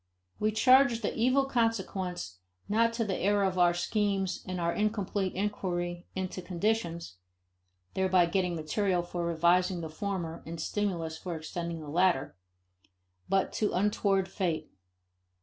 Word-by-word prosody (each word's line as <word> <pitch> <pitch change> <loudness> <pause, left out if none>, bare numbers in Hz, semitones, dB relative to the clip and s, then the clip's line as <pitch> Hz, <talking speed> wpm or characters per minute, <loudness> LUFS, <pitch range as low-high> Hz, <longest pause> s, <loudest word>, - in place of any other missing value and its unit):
We 215 +1 +2
charge 255 +2 +5
the - - 0
evil 255 +4 +3
consequence 190 - -1 0.3
not 230 +2 +3
to 230 -1 -1
the 195 -3 -1
error 205 +1 +2
of 185 -1 0
our 175 -1 +5
schemes 195 0 0
and 185 -1 -3
our 170 0 0
incomplete 205 -3 -1
inquiry 175 -3 -2
into 185 0 -3
conditions 175 - -2 0.8
(thereby 185 -2 +3
getting 180 0 0
material 175 +3 0
for 175 0 -4
revising 175 +2 +2
the 160 - -5
former 170 -2 -4
and 165 0 -7
stimulus 165 -4 -2
for 175 -2 -4
extending 165 +1 -5
the 150 - -9
latter) 170 - +2 0.9
but 195 -1 +1
to 210 - 0
untoward 195 0 +1
fate. 185 -4 -2
185 Hz, 135 wpm, -30 LUFS, 170-205 Hz, 0.9 s, charge